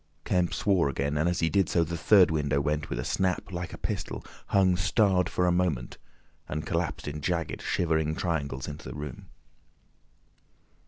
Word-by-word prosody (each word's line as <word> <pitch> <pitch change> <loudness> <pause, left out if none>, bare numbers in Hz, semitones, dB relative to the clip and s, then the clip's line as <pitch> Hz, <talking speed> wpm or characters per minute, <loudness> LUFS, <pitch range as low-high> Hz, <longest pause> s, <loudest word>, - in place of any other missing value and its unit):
Kemp 90 -1 +1
swore 95 -8 +2
again, 70 +2 -1
and 80 +4 +2
as 90 -1 -1
he 80 - +2
did 100 -4 +2
so 85 - +3
the 85 +1 -4
third 95 +1 +5
window 75 -3 +1
went 75 +1 -1
with - - -3
a 60 - -3
snap 95 +1 -1
like 85 -1 -4
a - - -8
pistol, - - -4 0.2
hung 95 -2 +3
starred 90 +1 +2
for 90 - +1
a 90 - +3
moment, 85 -9 -1 0.5
and 75 +2 -3
collapsed 85 0 -2
in 75 +1 -4
jagged, 85 +1 -2
shivering 80 -2 0
triangles 70 -7 -2
into 75 0 -7
the - - -7
room. 75 +7 -7
85 Hz, 175 wpm, -28 LUFS, 75-90 Hz, 0.5 s, third